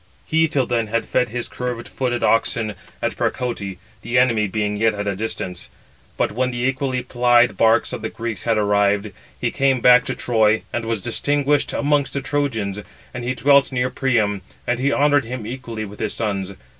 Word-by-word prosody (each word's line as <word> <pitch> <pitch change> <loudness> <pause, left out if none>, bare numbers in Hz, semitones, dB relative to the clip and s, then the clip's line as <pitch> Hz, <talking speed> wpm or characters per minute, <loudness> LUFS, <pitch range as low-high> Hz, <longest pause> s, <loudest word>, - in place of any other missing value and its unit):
He 160 +1 +2
till 140 -4 +1
then 120 -2 0
had 115 +2 -1
fed 125 -2 +1
his 120 +2 -4
curved 125 -2 -5
footed 125 -2 -2
oxen 115 -1 +1 0.3
at - - 0
Percote, 100 -7 -2 0.2
the 120 +2 -1
enemy 115 -4 +3
being 105 +1 -1
yet 110 +1 +2
at 100 0 -4
a 100 - 0
distance; 95 -4 -4 0.5
but - - +1
when 125 +4 0
the 120 -1 -3
equally 130 -1 -1
plied 120 -1 +3
barks 115 0 +3
of - - -4
the 110 - -3
Greeks 115 -4 -5
had 115 -2 +1
arrived, 100 0 +2 0.3
he - - -1
came 135 -1 +2
back 125 +1 +6
to 130 - -3
Troy, 110 -3 +2
and 120 -1 -2
was 115 -4 -2
distinguished 145 +4 +1
amongst 145 -1 +1
the 140 - -2
Trojans; 130 -8 -1 0.3
and 125 - -5
he 125 +2 -2
dwelt 140 +1 +4
near 125 0 0
Priam, 115 -7 +1 0.2
and 120 0 0
he 140 +2 +1
honoured 145 -2 +3
him 120 -1 -5
equally 115 -2 -5
with 105 0 -11
his - - -2
sons. 100 -3 -2
120 Hz, 190 wpm, -21 LUFS, 110-130 Hz, 0.5 s, back